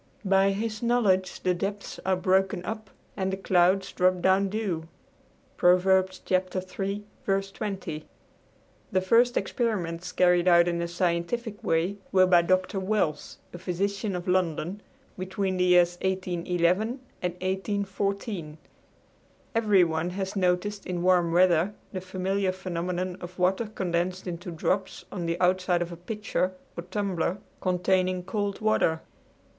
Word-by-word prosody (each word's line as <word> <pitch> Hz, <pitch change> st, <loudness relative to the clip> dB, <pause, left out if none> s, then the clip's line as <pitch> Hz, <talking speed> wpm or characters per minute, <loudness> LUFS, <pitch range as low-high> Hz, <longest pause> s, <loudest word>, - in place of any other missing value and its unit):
"By 195 Hz, 0 st, +4 dB
his 215 Hz, +2 st, -2 dB
knowledge 215 Hz, -6 st, +2 dB
the 185 Hz, -, +3 dB
depths 200 Hz, +3 st, -4 dB
are 190 Hz, -, +4 dB
broken 185 Hz, 0 st, +1 dB
up 215 Hz, -2 st, -5 dB, 0.3 s
and 190 Hz, -1 st, -1 dB
the 190 Hz, -, -2 dB
clouds 190 Hz, 0 st, +2 dB
drop 185 Hz, 0 st, +2 dB
down 190 Hz, +2 st, +3 dB
dew" 190 Hz, -6 st, -2 dB, 0.7 s
(Prov. 180 Hz, +1 st, +4 dB
iii. 190 Hz, +1 st, 0 dB, 0.5 s
20). 190 Hz, -8 st, -5 dB, 0.9 s
The 185 Hz, -, +2 dB
first 235 Hz, +6 st, +4 dB
experiments 180 Hz, -8 st, -2 dB
carried 180 Hz, 0 st, +3 dB
on 170 Hz, -1 st, +7 dB
in 170 Hz, -1 st, -1 dB
a 170 Hz, -, -1 dB
scientific 180 Hz, +6 st, -2 dB
way 170 Hz, +5 st, +1 dB
were 185 Hz, -1 st, +6 dB
by 180 Hz, -2 st, +5 dB
Dr. 185 Hz, +2 st, +1 dB
Wells, 190 Hz, -6 st, -1 dB, 0.2 s
a 175 Hz, -, -7 dB
physician 195 Hz, +3 st, -2 dB
of 180 Hz, 0 st, -5 dB
London, 180 Hz, +1 st, 0 dB, 0.4 s
between 190 Hz, 0 st, -2 dB
the 180 Hz, -, +2 dB
years 175 Hz, -1 st, +4 dB
1811 185 Hz, +4 st, 0 dB, 0.2 s
and 180 Hz, -1 st, -1 dB
1814. 195 Hz, -2 st, -3 dB, 1.0 s
Everyone 180 Hz, -7 st, +3 dB
has 190 Hz, +2 st, -4 dB
noticed 195 Hz, +2 st, 0 dB
in 175 Hz, -1 st, -2 dB
warm 180 Hz, -2 st, +3 dB
weather 180 Hz, +2 st, +3 dB, 0.2 s
the 185 Hz, -, -3 dB
familiar 190 Hz, +1 st, -1 dB
phenomenon 180 Hz, 0 st, -3 dB
of 180 Hz, 0 st, -9 dB
water 190 Hz, +5 st, +1 dB
condensed 185 Hz, -2 st, -2 dB
into 175 Hz, -1 st, -5 dB
drops 180 Hz, +3 st, -2 dB
on 175 Hz, -3 st, -4 dB
the 170 Hz, +1 st, -1 dB
outside 180 Hz, -1 st, +2 dB
of 175 Hz, -, -8 dB
a -, -, -6 dB
pitcher 185 Hz, 0 st, -2 dB, 0.2 s
or -, -, -4 dB
tumbler 190 Hz, -3 st, -1 dB, 0.2 s
containing 185 Hz, 0 st, +1 dB
cold 205 Hz, +1 st, -3 dB
water. 165 Hz, -7 st, +2 dB
185 Hz, 130 wpm, -27 LUFS, 175-195 Hz, 1.0 s, on